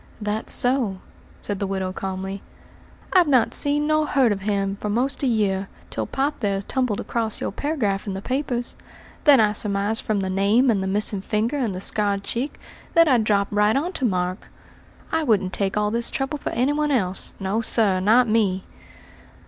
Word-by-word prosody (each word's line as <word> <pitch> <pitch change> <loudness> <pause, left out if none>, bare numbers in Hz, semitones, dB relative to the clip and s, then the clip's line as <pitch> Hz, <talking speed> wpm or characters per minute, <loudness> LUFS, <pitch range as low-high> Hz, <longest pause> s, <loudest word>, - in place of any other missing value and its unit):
"That's 210 +1 -2
so," 245 -6 +2 0.4
said 205 -2 -4
the 200 - -1
widow 190 -1 -2
calmly. 190 +1 -5 0.7
"I've 360 -3 +5
not 255 -5 +3
seen 290 +1 +1
nor 310 0 +2
heard 260 -6 +3
of 195 -1 -2
him 200 -1 -1
for 210 - -4
most 255 +6 0
a 275 - +1
year, 200 -4 0 0.2
till - - -3
pop 280 +2 -1
there 200 -3 0
tumbled 250 -3 -1
across 225 -2 -2
your - - -3
paragraph 220 -10 -2
in 195 - -3
the 190 - -5
papers. 255 -2 -2 0.5
Then 285 -4 +7
I 215 -1 +4
surmised 205 +1 0
from 210 -2 -1
the 190 - -2
name 210 +7 +3
and 200 -3 0
the 190 - -2
missing 205 0 0
finger 220 +7 -1
and 230 -8 -1
the - - -4
scarred 200 -1 0
cheek, 255 +8 -4 0.4
that 335 0 +6
I'd 250 -6 +4
dropped 205 -1 +1
right 210 +1 +3
on 335 +7 -1
to 265 - -1
Mark. 180 -3 -1 0.6
I 320 - +1
wouldn't 200 -9 +1
take 195 0 -1
all 210 0 +1
this 235 +1 -1
trouble 275 +2 -3
for - - -3
any 255 +5 +1
one 300 0 0
else; 195 -9 -1
no, 195 +4 -1
sir, 215 -4 +1
not 225 +6 +4
me!" 205 -4 +1
215 Hz, 190 wpm, -23 LUFS, 195-260 Hz, 0.7 s, Then